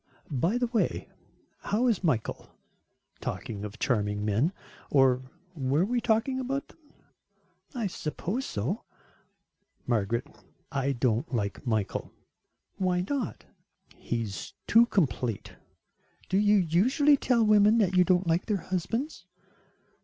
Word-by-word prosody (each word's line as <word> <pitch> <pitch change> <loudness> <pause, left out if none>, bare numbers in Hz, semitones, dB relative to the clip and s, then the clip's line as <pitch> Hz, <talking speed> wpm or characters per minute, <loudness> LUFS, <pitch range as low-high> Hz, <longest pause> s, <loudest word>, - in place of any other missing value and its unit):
"By 165 - +1
the 245 - +1
way, 235 -1 -1 0.5
how 220 +5 0
is 225 -6 +1
Michael, 130 -10 -1 0.7
talking 105 -3 -5
of 105 0 -7
charming 105 -4 0
men. 110 - +2 0.4
Or, 130 -2 +4 0.3
were 145 +2 +1
we 240 +3 0
talking 230 +4 +1
about 270 +2 -3
them?" - - -20 1.0
"I 235 -3 -1
suppose 190 - -3
so." 135 - -3 1.0
"Margaret, 115 0 0 0.5
I 135 0 0
don't 120 +3 0
like 100 +1 -3
Michael." 110 -4 -1 0.7
"Why 180 -2 +1
not?" 270 -6 -3 0.5
"He 115 -1 -3
is 100 -4 -6
too 230 +2 +6
complete." 125 - -1 0.8
"Do 190 - +3
you 210 0 +5
usually 225 - +4
tell 245 -4 +2
women 210 +1 +5
that 190 -4 +2
you 180 - +6
don't 185 0 +2
like 170 +2 +1
their 210 -3 +1
husbands?" 225 - -3
180 Hz, 125 wpm, -28 LUFS, -, 1.0 s, too